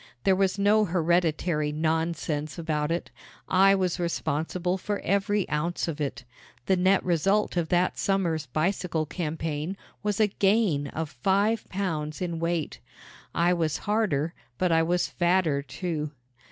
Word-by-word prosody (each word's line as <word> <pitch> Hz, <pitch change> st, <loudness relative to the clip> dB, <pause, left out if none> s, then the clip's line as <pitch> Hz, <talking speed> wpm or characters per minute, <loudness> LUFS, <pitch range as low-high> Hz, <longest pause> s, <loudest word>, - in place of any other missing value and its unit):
There 190 Hz, -, +4 dB
was 190 Hz, 0 st, +1 dB
no 210 Hz, +2 st, +4 dB
hereditary 165 Hz, -3 st, +1 dB
nonsense 155 Hz, -1 st, -1 dB
about 155 Hz, -2 st, -1 dB
it. 170 Hz, -, -2 dB, 0.4 s
I 195 Hz, +1 st, +5 dB
was 185 Hz, -2 st, 0 dB
responsible 170 Hz, +2 st, -1 dB
for 205 Hz, +2 st, -2 dB
every 200 Hz, 0 st, +1 dB
ounce 170 Hz, +4 st, -1 dB
of 160 Hz, -2 st, -4 dB
it. 140 Hz, -3 st, -3 dB, 0.4 s
The 190 Hz, -, +3 dB
net 185 Hz, +2 st, +3 dB
result 190 Hz, +5 st, +2 dB
of 170 Hz, -3 st, 0 dB
that 180 Hz, +1 st, +1 dB
summer's 170 Hz, -6 st, 0 dB
bicycle 160 Hz, +2 st, -1 dB
campaign 160 Hz, +1 st, -3 dB, 0.2 s
was 205 Hz, 0 st, -1 dB
a 215 Hz, -, +6 dB
gain 195 Hz, -7 st, +2 dB
of 160 Hz, +2 st, -4 dB
five 200 Hz, -, +1 dB
pounds 160 Hz, -6 st, -3 dB
in 170 Hz, -3 st, -3 dB
weight. 165 Hz, -2 st, -2 dB, 0.6 s
I 175 Hz, +1 st, +3 dB
was 160 Hz, -3 st, 0 dB
harder 185 Hz, -8 st, +1 dB, 0.2 s
but 180 Hz, -2 st, +1 dB
I 165 Hz, 0 st, +4 dB
was 175 Hz, +2 st, +1 dB
fatter, 175 Hz, -5 st, +1 dB
too. 155 Hz, 0 st, -4 dB
170 Hz, 140 wpm, -27 LUFS, 155-190 Hz, 0.6 s, a